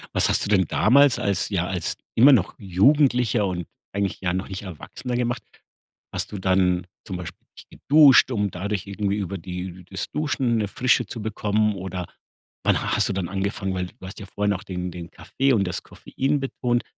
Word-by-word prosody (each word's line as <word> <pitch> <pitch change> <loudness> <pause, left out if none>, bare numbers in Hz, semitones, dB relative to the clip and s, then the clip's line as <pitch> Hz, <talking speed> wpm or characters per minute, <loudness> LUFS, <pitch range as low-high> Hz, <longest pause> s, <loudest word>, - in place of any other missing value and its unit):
Was - - +4
hast - - +2
du - - -4
denn 95 -3 +4
damals 140 +3 +4
als 100 -3 0
ja, 90 -4 -1
als 90 -3 -2 0.2
immer 130 +6 +8
noch 105 -8 +3
Jugendlicher 120 - +3
und 90 -3 -3 0.3
eigentlich 100 -1 -2
ja 90 -2 0
noch 95 +1 -3
nicht 95 0 -6
Erwachsener 100 - -6
gemacht? 120 0 -1 0.7
Hast - - -3
du 105 - -5
dann 90 -1 +1 0.2
zum 95 - -5
Beispiel 90 -1 -9
dich - - -13
geduscht, 140 -3 +5
um 105 -4 0
dadurch 100 +2 -3
irgendwie 100 0 -2
über 100 -1 -3
die 90 +1 -7
das 95 -1 -4
Duschen 135 -6 0
'ne 105 -2 0
Frische 125 +4 +2
zu 110 +2 -7
bekommen 105 0 0
oder 95 -2 -5 0.6
wann - - +3 0.2
hast - - +2
du - - -1
dann 95 -3 -3
angefangen, 95 0 -2
weil 90 -1 -2
du 95 - -14
hast 95 - -9
ja 105 - -8
vorher 105 +1 -1
noch 100 -2 -1
den 90 -1 -4
den 85 -1 -9
Kaffee 135 0 0
und 105 -5 +3
das 90 - -4
Koffein 140 +2 -2
betont, 125 -3 -1
100 Hz, 195 wpm, -24 LUFS, 95-120 Hz, 0.7 s, immer